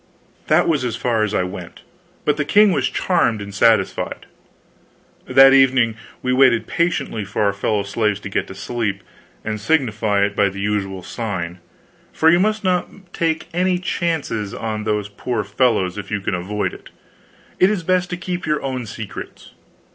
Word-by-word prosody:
That - - +4
was 150 -5 +1
as 120 -3 -2
far 115 -2 0
as 110 -1 0
I - - +2
went, 90 -1 -8 0.4
but 150 - +3
the 150 - +1
king 205 +6 +5
was - - +1
charmed 120 - +1
and 100 0 -8
satisfied. 115 +2 +1 1.0
That 135 0 +7
evening 130 -4 +4 0.3
we 125 0 +1
waited 130 -3 +4
patiently 170 -10 -1
for 100 +2 -2
our 100 -1 +2
fellow 100 +1 -1
slaves 105 0 -1
to 95 - -6
get - - -1
to 95 - -9
sleep 110 0 -3 0.4
and 110 -1 -3
signify 110 -7 +1
it 100 0 -4
by 100 -1 +3
the 100 +1 -8
usual 100 -2 -2
sign, 90 -7 -4 0.5
for 160 +1 +4
you 175 - +4
must 215 +2 +1
not 185 0 -2
take 165 -1 -2
many 180 +1 +1
chances 160 - -2
on 110 -1 -4
those 105 -2 -1
poor 110 +2 -3
fellows 100 -3 +1
if 95 -2 -8
you 105 - -1
can 100 - -3
avoid 95 +4 -2
it. - - -12 0.7
It 185 - +6
is 205 -5 -1
best 180 +1 +1
to 180 - -3
keep 180 0 -4
your 150 -1 0
own 130 -3 -3
secrets. 110 0 -8
115 Hz, 175 wpm, -20 LUFS, 100-160 Hz, 1.0 s, That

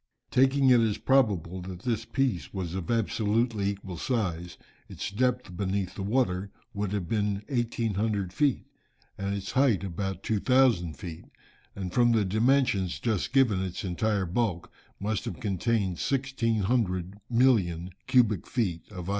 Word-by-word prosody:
"Taking 135 +1 +4
it 125 - +7
as 110 -2 +1
probable, 100 - +1
that 90 -1 -8
this 115 -2 -1
piece 115 - -1
was 90 -3 -4
of 95 -3 -4
absolutely 110 -1 +1
equal 95 -3 -6
size, 90 -7 -2 0.3
its - - -5
depth 125 -3 0
beneath 95 0 -2
the - - -6
water, 100 -3 0 0.2
would 100 -2 -2
have 100 -4 -2
been 105 -1 -1
1800 110 -6 -1
feet, 145 +2 +1 0.5
and 100 0 -2
its 100 -1 -5
height 130 -7 +3
about 95 0 -4
2000 110 - +2
feet, 80 +1 -8 0.5
and 95 -2 -5
from 120 -1 +4
the 110 -3 +2
dimensions 110 -3 +2
just 110 -4 -1
given 125 -8 +3
its 95 +4 -4
entire 100 +2 0
bulk 90 -1 -1 0.3
must 105 +1 -2
have - - -5
contained 100 -3 0
1600 115 -8 0
million 100 -9 +2 0.2
cubic 110 -8 +3
feet 95 -8 -2
of 90 -3 -7
ice." - - -3
105 Hz, 145 wpm, -28 LUFS, 95-120 Hz, 0.5 s, it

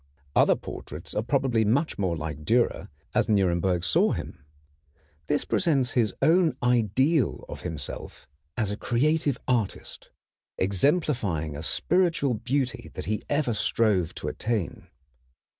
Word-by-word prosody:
Other - - +5
portraits - - -7
are - - 0
probably 125 -1 +1
much 125 +8 +1
more 90 -4 0
like 75 -1 -5
Dürer 120 +8 +1 0.2
as - - +1
Nuremberg 90 -3 +2
saw 90 - +3
him. - - -6 0.8
This 145 - 0
presents 140 -9 +1
his 115 -5 +2
own 165 -5 +4
ideal 125 - +2
of - - -8
himself 80 -6 -6 0.3
as 105 -3 0
creative 145 +2 +1
artist, 120 -6 -2 0.5
exemplifying 100 - 0
a 75 - -5
spiritual 165 - +1
beauty 125 +3 -2
that - - -5
he 105 +1 -1
ever 145 -5 +1
strove 100 -4 +1
to - - -6
attain. 110 -6 -3
115 Hz, 125 wpm, -26 LUFS, 95-140 Hz, 0.8 s, Other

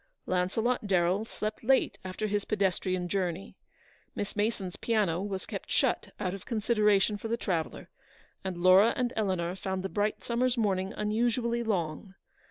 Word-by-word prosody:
Launcelot 210 +6 0
Darrell 185 +2 +2
slept 215 -1 -5
late 265 +3 +2
after 185 +3 -4
his 205 -1 0
pedestrian 185 -3 0
journey. 185 0 -2 0.6
Miss 205 - -4
Mason's 205 -3 -1
piano 205 -7 +1
was 195 -1 -4
kept - - -6
shut, - - +1
out 185 -3 -1
of 195 - -7
consideration 210 -3 +2
for 225 - -5
the 230 +1 0
traveller; 170 -8 -2 0.6
and 190 -2 -3
Laura 185 +5 +6
and 245 -1 0
Eleanor 185 -4 0
found 190 -1 -3
the 195 - -2
bright 205 +2 -1
summer's 245 +1 +1
morning 195 -4 +1
unusually 235 +2 +1
long. 190 -3 -2
200 Hz, 150 wpm, -30 LUFS, 185-220 Hz, 0.6 s, Laura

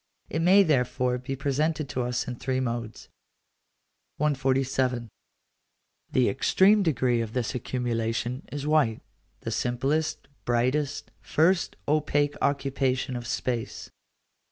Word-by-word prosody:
It 160 - -1
may 190 +4 +6
therefore 125 -5 +1
be 130 +2 -4
presented 150 +3 0
to 125 - -2
us 125 0 -2
in 125 -1 -5
three 130 +1 -1
modes. 120 -3 -4 1.1
147. 135 -4 0 1.0
The 130 -2 +3
extreme 195 +9 +4
degree 130 -8 +1
of 115 -1 -5
this 125 -1 -1
accumulation 120 0 -2
is 145 0 -4
white; 150 -8 +2 0.4
the - - -4
simplest, 135 +6 -1 0.2
brightest, 130 +4 0
first, 170 +3 +2
opaque 145 -1 +2
occupation 135 -2 0
of 120 -1 -5
space. 120 -3 -3
130 Hz, 110 wpm, -27 LUFS, 125-150 Hz, 1.1 s, may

